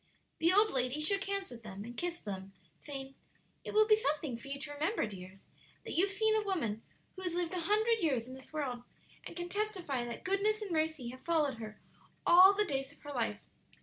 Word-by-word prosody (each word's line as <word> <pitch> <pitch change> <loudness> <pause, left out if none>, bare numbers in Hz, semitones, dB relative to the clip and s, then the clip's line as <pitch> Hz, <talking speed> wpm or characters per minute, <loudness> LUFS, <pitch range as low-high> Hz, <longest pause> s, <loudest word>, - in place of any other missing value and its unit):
The 335 +2 +4
old 420 +3 +5
lady 255 +2 0
shook 390 +6 +2
hands 395 -3 -2
with 230 -2 -10
and 210 +3 -7
kissed 350 -1 -3
them, 195 -1 -5 0.3
saying, 270 -2 -7 0.5
"It - - -6
will 430 0 +7
be 430 0 +6
something 300 - -1
for 235 +4 -10
you 280 0 -4
to 290 +1 -5
remember, 315 - 0
dears, 190 -2 -9 0.4
that - - -4
you 350 - +5
have - - -6
seen 435 +2 +2
a 435 - +2
woman 275 - -1 0.3
who 375 - -8
has 360 -2 -2
lived 350 0 -1
a 365 - -1
hundred 435 +5 +2
years 260 -8 +1
in 255 - -8
this 260 0 -11
world, 275 -6 -2 0.5
and - - -9
can 350 0 -3
testify 370 - -1
that 235 -1 -6
goodness 400 +3 +2
and 420 -4 -5
mercy 315 -6 0
have 255 +1 -10
followed 300 -7 +1
her 215 -1 -8 0.5
all 370 +3 +9
the 420 +1 +2
days 270 -5 -2
of 285 - -20
her 290 -1 -6
life. 230 -5 -1
310 Hz, 215 wpm, -33 LUFS, 250-390 Hz, 0.5 s, all